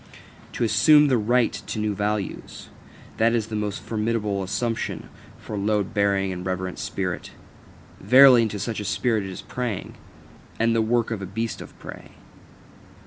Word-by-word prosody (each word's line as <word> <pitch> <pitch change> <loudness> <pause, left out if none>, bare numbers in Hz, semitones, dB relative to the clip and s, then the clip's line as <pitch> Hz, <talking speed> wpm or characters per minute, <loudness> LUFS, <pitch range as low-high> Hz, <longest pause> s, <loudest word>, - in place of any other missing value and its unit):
To - - -2
assume 150 +5 +5
the 130 - +3
right 120 +3 +2
to - - -6
new 105 -1 -1
values 105 0 -4 0.5
that 115 +1 +3
is 110 -2 -2
the 110 - -4
most 105 -1 -3
formidable 105 -2 -1
assumption 115 +5 -3 0.3
for - - -10
a 105 - -2
load 105 -1 0
bearing 100 -2 +1
and 90 0 -6
reverent 95 0 -4
spirit. 90 -3 -4 0.7
Verily, 125 +3 +7
unto 110 -2 -1
such 110 +2 -3
a 105 - -5
spirit 110 +2 0
it - - -6
is 95 - -8
preying, 120 -6 -4 0.7
and 115 0 +2
the 115 - +3
work 115 +1 0
of 110 -3 -3
a 95 - -5
beast 110 +4 -4
of - - -12
prey. - - -11
105 Hz, 165 wpm, -24 LUFS, 100-115 Hz, 0.7 s, Verily